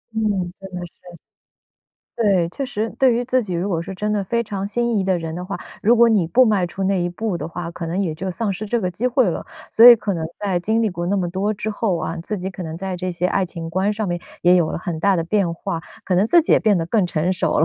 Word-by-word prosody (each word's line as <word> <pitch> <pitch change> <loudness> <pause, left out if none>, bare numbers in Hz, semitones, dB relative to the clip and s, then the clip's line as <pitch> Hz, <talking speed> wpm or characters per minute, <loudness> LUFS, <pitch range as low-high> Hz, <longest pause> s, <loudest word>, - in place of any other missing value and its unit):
嗯， 205 -5 0
真 195 - -9
的 180 -1 -5
是。 - - -27 1.2
对， 195 -7 +2
确 275 - -4
实， 225 -3 -3
对 260 -3 +4
于 240 +1 -1
自 255 +1 +1
己 190 -5 -5
如 175 +4 -1
果 170 -5 -1
是 190 +3 -6
真 210 +3 -2
的 205 - 0
非 235 +5 -1
常 200 -2 -4
心 235 +1 0
仪 - - +1
的 190 -1 +1
人 165 -1 -5
的 175 - -5
话， 195 +2 -5 0.2
如 235 +4 +5
果 235 0 +6
你 210 -7 +2
不 255 +10 +5
迈 205 -6 +2
出 190 +3 -4
那 190 -2 +1
一 175 - 0
步 195 +2 -3
的 155 - -5
话， 170 0 -5
可 170 0 -6
能 175 +4 -2
也 175 -6 -1
就 190 +4 -4
丧 205 +2 -2
失 205 +3 -5
这 235 +3 0
个 185 -5 -1
机 215 +8 -2
会 250 -3 +3
了， 170 - -3 0.3
所 230 - +8
以 240 - +10
可 205 -2 -2
能 165 -2 -3
在 195 -4 -1
经 220 +5 +1
历 220 - +1
过 175 -1 -4
那 200 +3 +1
么 185 -3 0
多 195 +4 -1
之 210 +2 -3
后 205 -3 0
啊， 165 +1 -3
自 190 +6 -4
己 190 0 -4
可 190 -1 -7
能 160 -1 -6
在 190 +1 -4
这 185 +1 -3
些 175 0 -1
爱 195 +1 +1
情 165 -2 -6
观 190 +4 +1
上 215 0 -3
面 175 -1 -2 0.2
也 180 +1 +6
有 170 -3 +2
了 - - -3
很 170 -2 -4
大 200 +1 +3
的 165 - -1
变 180 -1 +1
化， 165 0 -4 0.2
可 185 - 0
能 190 +4 +3
自 340 +8 +5
己 - - +1
也 - - +5
变 215 -3 +3
得 165 - 0
更 195 +1 +2
成 175 +1 0
熟 185 - 0
了， 155 - +5
190 Hz, 310 characters per minute, -21 LUFS, 175-215 Hz, 1.2 s, 以